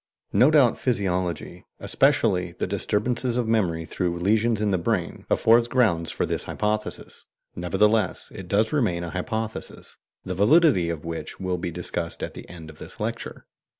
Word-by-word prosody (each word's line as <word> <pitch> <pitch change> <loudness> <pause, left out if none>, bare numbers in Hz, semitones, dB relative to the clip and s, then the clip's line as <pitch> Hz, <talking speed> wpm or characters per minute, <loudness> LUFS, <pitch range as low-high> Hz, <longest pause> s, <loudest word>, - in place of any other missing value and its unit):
No 130 - +6
doubt 145 -6 +4
physiology, 95 -7 -2
especially 100 -11 +2
the - - -3
disturbances 120 +3 -1
of 120 -2 0
memory 90 -8 +1
through 85 +2 -2
lesions 110 +5 +2
in 105 -1 +1
the 95 - +1
brain, 85 - -2
affords 115 +1 +4
grounds 105 -11 +2
for - - -1
this - - -3
hypothesis; 105 0 -3 0.3
nevertheless 100 +3 +1
it 95 - -8
does 105 - +1
remain 105 - +1
a 85 - -5
hypothesis, 110 +4 -5 0.3
the 95 - -3
validity 105 - +4
of 85 -2 -5
which 80 -2 -6
will 90 -1 -2
be 90 0 -3
discussed 85 0 -4
at - - -4
the - - -11
end 80 -3 -10
of 75 - -18
this - - -11
lecture. - - -5
100 Hz, 160 wpm, -25 LUFS, 85-115 Hz, 0.3 s, No